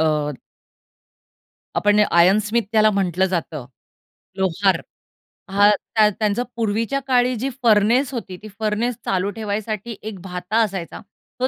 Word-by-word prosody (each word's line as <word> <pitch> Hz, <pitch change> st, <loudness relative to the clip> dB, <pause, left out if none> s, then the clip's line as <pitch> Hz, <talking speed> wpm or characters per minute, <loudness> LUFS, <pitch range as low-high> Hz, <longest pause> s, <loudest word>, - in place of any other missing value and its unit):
अ 150 Hz, -2 st, +1 dB, 1.5 s
आपण 205 Hz, 0 st, +3 dB
iron 180 Hz, +5 st, +5 dB
Smith 215 Hz, +3 st, 0 dB
त्याला 215 Hz, -1 st, +5 dB
म्हटलं 190 Hz, -2 st, +1 dB
जातं. 165 Hz, -7 st, -3 dB, 0.7 s
लोहार 190 Hz, +1 st, +1 dB, 0.7 s
हां, 205 Hz, +1 st, +5 dB, 0.3 s
त्या 215 Hz, -1 st, +5 dB
त्यांचा 215 Hz, +2 st, +1 dB
पूर्वीच्या 230 Hz, +4 st, -1 dB
काळी 250 Hz, -1 st, +2 dB
जी 250 Hz, +4 st, -2 dB
फर्नेस 235 Hz, +5 st, +3 dB
होती, 215 Hz, -7 st, -6 dB
ती -, -, -8 dB
फर्नेस 220 Hz, +3 st, -1 dB
चालू 190 Hz, +1 st, 0 dB
ठेवायसाठी 215 Hz, +1 st, -4 dB
एक 215 Hz, -3 st, -7 dB
भाता 180 Hz, +3 st, -4 dB
असायचा, 190 Hz, -6 st, -5 dB, 0.4 s
तो 255 Hz, -, +2 dB
210 Hz, 125 wpm, -21 LUFS, 190-225 Hz, 1.5 s, iron